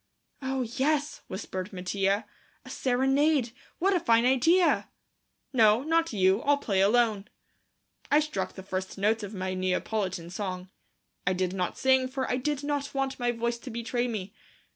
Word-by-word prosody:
"Oh, 265 -1 -1
yes," 285 +5 -1
whispered 185 0 -5
Mattia, 195 +2 -1 0.4
"a - - -9
serenade. 270 +1 +2 0.3
What 390 +3 +2
a 365 - +3
fine 230 -6 +3
idea!" 325 +8 +3 0.6
"No, 225 0 +5
not 330 +2 +1
you; 190 0 +3
I'll 290 0 +3
play 200 -8 0
alone." 215 -1 +3 0.8
I 295 - +5
struck 305 0 -2
the 190 - -9
first 190 0 -4
notes 215 +3 +1
of 205 0 -7
my 185 0 -3
Neapolitan 185 -1 -2
song. 185 -1 -5 0.6
I 180 - +4
did 185 0 -1
not 180 -2 -2
sing, 260 -1 +3
for 260 0 -3
I 250 - 0
did 290 +2 -2
not 285 -1 -2
want 270 -1 -1
my 245 0 +1
voice 235 0 -2
to 255 - -9
betray 240 +1 -2
me. 205 -4 -5
235 Hz, 160 wpm, -28 LUFS, 195-270 Hz, 0.8 s, No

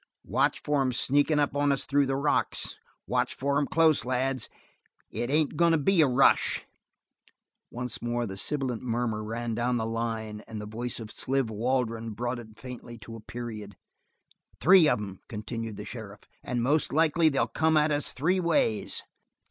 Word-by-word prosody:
"Watch - - +1
for 145 -2 +1
'em 130 -1 +1
sneakin' 145 +5 +2
up 145 -1 +1
on 145 0 +2
us 135 - 0
through 140 0 +2
the 135 - 0
rocks. 140 +2 0 0.3
Watch - - 0
for 140 +1 0
'em 145 - 0
close, 160 -4 +4
lads. 130 0 -1 0.6
It 120 - -3
ain't 150 +1 +1
goin' 170 +1 +4
to - - +4
be 170 +4 +3
a 150 - +5
rush." 130 +1 +3 1.0
Once 125 0 -4
more 120 0 -1
the 95 -3 -6
sibilant 130 +2 -2
murmur 115 -3 -1
ran 115 +2 -3
down 120 +2 0
the 110 - -1
line, 110 -2 -3
and 110 -2 -6
the 105 - -6
voice 115 +3 -5
of 110 -1 -8
Sliver 130 -4 -1
Waldron 115 -1 -1
brought 120 +2 -2
it 110 -2 -12
faintly 125 -2 -9
to 115 0 -10
a - - -8
period. 110 -3 -7 0.8
"Three 180 -3 +7
of 125 - +2
'em," 100 -3 -7
continued 115 0 -5
the - - -7
sheriff, 105 -4 -8 0.2
"and 120 -1 -2
most 145 +5 +2
likely 160 +1 +4
they'll 140 - +1
come 160 0 +1
at 150 0 +3
us 145 -1 +1
three 180 +8 +1
ways." 165 - +1
125 Hz, 180 wpm, -28 LUFS, 115-145 Hz, 1.0 s, Three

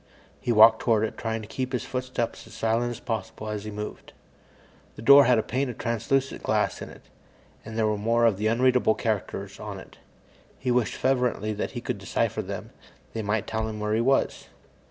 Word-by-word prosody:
He 120 - -1
walked 110 0 +7
toward 110 -3 +2
it, 110 - -2
trying 110 -1 -3
to - - -9
keep 130 +4 -4
his 125 - -1
footsteps 125 -3 -3
as 110 - -13
silent 115 +2 +1
as 120 -1 -6
possible 110 -1 -4
as 105 -1 -4
he - - -4
moved. 105 0 -7 0.8
The 110 - -9
door 140 +3 +9
had 125 0 +4
a 110 - +1
pane 130 +2 -1
of 120 - -7
translucent 120 +4 -1
glass - - 0
in - - -6
it, - - -14 0.6
and 110 0 -8
there 110 - +2
were 105 -1 0
more 115 +2 +2
of 110 -4 +3
the 105 +2 0
unreadable 125 0 +3
characters 110 -4 -3
on - - -6
it. - - -15 0.6
He 125 - -1
wished 120 -2 +1
fervently 125 -5 0
that 105 - -4
he - - -5
could - - -3
decipher - - -1
them; - - -7 0.4
they 115 - -2
might 105 0 -1
tell 110 0 -2
him 110 -1 -5
where 105 0 -1
he 110 - +2
was. 135 +3 +1
115 Hz, 205 wpm, -26 LUFS, 110-125 Hz, 0.8 s, door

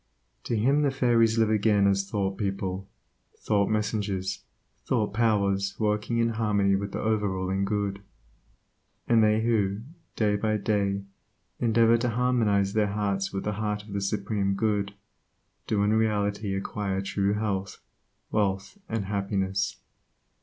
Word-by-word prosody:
To 115 - 0
him 135 +7 +3
the 145 - +3
fairies 120 -4 +3
live 110 -1 +3
again 105 -1 +3
as 100 0 +1
thought 100 -2 -1
people, 95 -2 -3 0.5
thought 100 -2 +1
messengers, 105 -3 -1 0.4
thoughtpowers 105 -4 +1
working 105 +2 0
in 115 0 +2
harmony 105 -3 +1
with 100 0 -3
the - - -4
over 110 -2 +1
ruling 95 +1 -1
Good. 100 -1 -2 1.1
And 115 -2 +5
they 110 +1 +3
who, 105 -3 +1 0.3
day 105 -2 +2
by 110 +1 0
day, 100 -2 0 0.6
endeavor 115 0 +4
to 120 +1 0
harmonize 110 -5 +1
their 110 -1 +2
hearts 100 -2 -1
with 95 - -3
the 105 - -1
heart 105 -1 -2
of 105 -1 -10
the 100 - -1
Supreme 100 0 -1
Good, 100 -1 0 0.7
do 105 -2 +1
in 105 +1 +2
reality 105 -2 0
acquire 95 0 -2
true 100 +1 0
health, 100 -2 -2 0.5
wealth, 100 - -1
and 115 -3 -2
happiness. 100 -1 -1
105 Hz, 140 wpm, -27 LUFS, 100-110 Hz, 1.1 s, And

